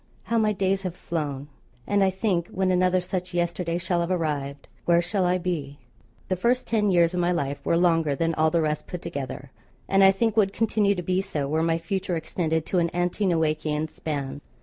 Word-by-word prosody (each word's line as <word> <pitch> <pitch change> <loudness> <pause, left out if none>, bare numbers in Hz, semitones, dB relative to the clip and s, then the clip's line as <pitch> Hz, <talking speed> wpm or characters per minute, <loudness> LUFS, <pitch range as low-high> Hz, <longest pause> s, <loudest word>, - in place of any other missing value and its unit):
How 230 0 0
my 215 -1 +3
days 195 -1 0
have 185 -3 -4
flown! 145 -6 -4 0.4
And 205 -1 +2
I 190 - +4
think 190 -3 -1
when 190 -1 0
another 185 0 +3
such 180 0 -4
yesterday 175 0 -1
shall 175 0 -1
have 170 0 -1
arrived, 145 -6 -2 0.2
where 170 0 +4
shall 180 +2 0
I 180 +1 +2
be? 160 -6 -3 0.5
The 185 - 0
first 240 +7 +1
ten 210 -3 +1
years 170 -2 +4
of 180 - -1
my 175 0 +2
life 140 -4 -2
were 170 - +2
longer 165 -4 +2
than 165 +3 0
all 160 0 +3
the 165 +1 +1
rest 150 -1 -1
put 180 - -6
together, 135 -1 -6 0.4
and 195 0 +4
I 195 - +9
think 210 +2 +1
would 200 -3 +3
continue 210 -2 +2
to 180 - -4
be 185 +2 +1
so 145 -7 -3
were 155 +3 0
my 165 0 +2
future 180 +2 -2
extended 160 -1 -1
to 185 - +1
an 170 -1 +1
ante 175 +4 0
Noachian 155 -2 0
span. 145 -2 -4
175 Hz, 210 wpm, -25 LUFS, 160-190 Hz, 0.5 s, I